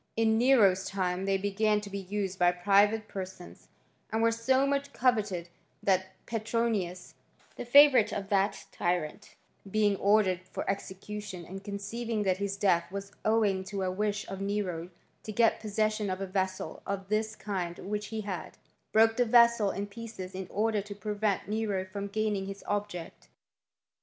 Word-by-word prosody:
In 220 0 +3
Nero's 215 -7 +5
time 185 -1 -1
they 195 0 +2
began 210 +2 +1
to 205 - -8
be 200 - -3
used 195 0 -3
by 175 0 +5
private 205 +4 +3
per 195 -2 -4
sons; 185 -1 -12 0.4
and 220 +1 +1
were 230 - +4
so 260 +4 +2
much 280 0 -1
coveted 210 -9 +1 0.4
that 190 -1 +1
Petronius, 220 -5 -2 0.4
the - - -6
favourite 270 -3 +7
of 200 -1 -4
that 200 0 +1
tyrant, 175 -3 -2 0.3
being 210 0 +2
ordered 200 -3 +3
for - - -5
execution, 195 -1 -5
and 195 +3 -8
conceiving 210 +2 -3
that 185 -2 +1
his 200 0 -2
death 185 -4 +2
was 200 0 -6
owing 210 -4 +2
to 195 0 -3
a 185 - 0
wish 210 +2 -2
of 195 0 -6
Nero 195 -4 -2 0.3
to 215 - -6
get 230 +1 +3
possession 215 -1 0
of 185 0 -2
a 195 - -2
vessel 190 0 -3
of 195 -1 -4
this 215 0 0
kind 180 -5 -4
which 210 +1 -4
he 220 -1 -4
had, 190 -6 -6 0.3
broke 225 +1 +4
the 245 - +5
vessel 235 -2 +5
in 200 +1 -3
pieces 205 -3 -8
in 190 -1 -5
order 215 0 +1
to 205 0 -8
prevent 205 -2 -1
Nero 210 -3 -1
from 200 +1 -5
gaining 205 -2 -1
his 195 0 -7
object. 205 -5 -4
205 Hz, 165 wpm, -30 LUFS, 190-220 Hz, 0.4 s, favourite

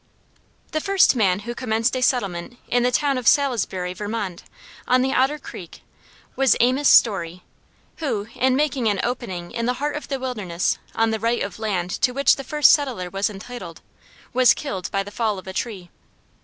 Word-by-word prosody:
The 310 - -1
first 390 -6 +4
man 200 -4 +2
who 240 +3 -5
commenced 230 0 0
a 255 - -2
settlement 220 -4 -1
in 245 - +2
the 245 - +3
town 275 +1 +1
of 245 - -5
Salisbury, 220 - +1
Vermont, 205 -2 -4 0.5
on 255 0 +3
the 265 +1 0
Otter 270 +3 +2
Creek, 180 - -11 0.5
was 270 -4 +4
Amos 260 +4 +3
Storey, 180 -5 +3 0.5
who, 240 -10 -2
in 260 0 +2
making 275 -4 0
an 205 -2 +1
opening 190 -8 -4
in 235 0 -2
the 250 - +2
heart 295 +3 -2
of 295 - -6
the 275 -1 -3
wilderness 210 -10 -2 0.2
on 225 0 +2
the 220 - -2
right 230 +2 0
of 200 +1 -6
land 190 -5 -2
to 250 - 0
which 280 0 +4
the 275 - -6
first 300 +2 +5
settler 245 - 0
was 195 +2 0
entitled, 215 +5 -9 0.5
was 255 0 +5
killed 195 -11 -5
by 195 0 -1
the 205 - -10
fall 215 -2 -1
of 185 - -9
a 190 - -7
tree. 195 -4 -5
235 Hz, 185 wpm, -22 LUFS, 195-260 Hz, 0.5 s, first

